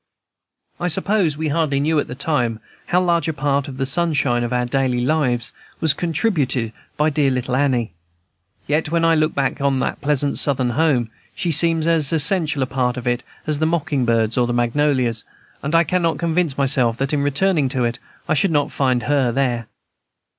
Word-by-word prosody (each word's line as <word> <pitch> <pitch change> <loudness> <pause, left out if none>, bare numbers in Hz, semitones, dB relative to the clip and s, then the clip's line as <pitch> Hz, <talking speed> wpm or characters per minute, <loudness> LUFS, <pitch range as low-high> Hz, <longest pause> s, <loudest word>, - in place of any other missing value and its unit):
I 175 - -1
suppose 185 -2 0
we 155 0 -2
hardly 145 -2 0
knew, 155 +2 +1
at - - -2
the 125 - -7
time, 125 -6 -1 0.3
how 180 - +2
large 170 -3 +1
a 160 - -1
part 140 -1 0
of 135 -2 -8
the 135 - -1
sunshine 140 -5 +1
of 120 - -3
our 125 0 0
daily 125 -1 0
lives 130 -6 0 0.3
was 160 -3 +3
contributed 150 - -1 0.2
by 150 +1 +2
dear 140 -1 +2
little 125 -1 -1
Annie. 130 -7 0 0.7
Yet, 150 +1 0
when 165 +1 +1
I 165 - +4
now 160 - +2
look 155 +1 0
back 140 0 -1
on 140 -1 +1
that - - -3
pleasant 145 -1 0
Southern 130 -3 +1
home, 130 -5 +1 0.2
she 180 -4 -1
seems 165 +1 +2
as 160 -4 +2
essential 160 -3 +2
a - - 0
part 125 -1 -1
of 125 - -6
it 120 0 0 0.2
as 150 -2 -1
the 160 - +2
mocking 150 -5 0
birds 115 -1 +1
or 120 - +2
the 120 - -1
magnolias, 120 -1 +1 0.4
and 150 +4 -2
I 165 - +6
cannot 170 0 0
convince 170 -4 0
myself 130 -4 +2
that 135 +2 -2
in 145 - +1
returning 145 +1 +1
to 130 -2 -1
it 120 0 -2 0.3
I - - +2
should 155 +6 +2
not 145 -3 0
find 130 -3 0
her 140 -3 +1
there. 120 -3 -1
140 Hz, 195 wpm, -20 LUFS, 125-160 Hz, 0.7 s, I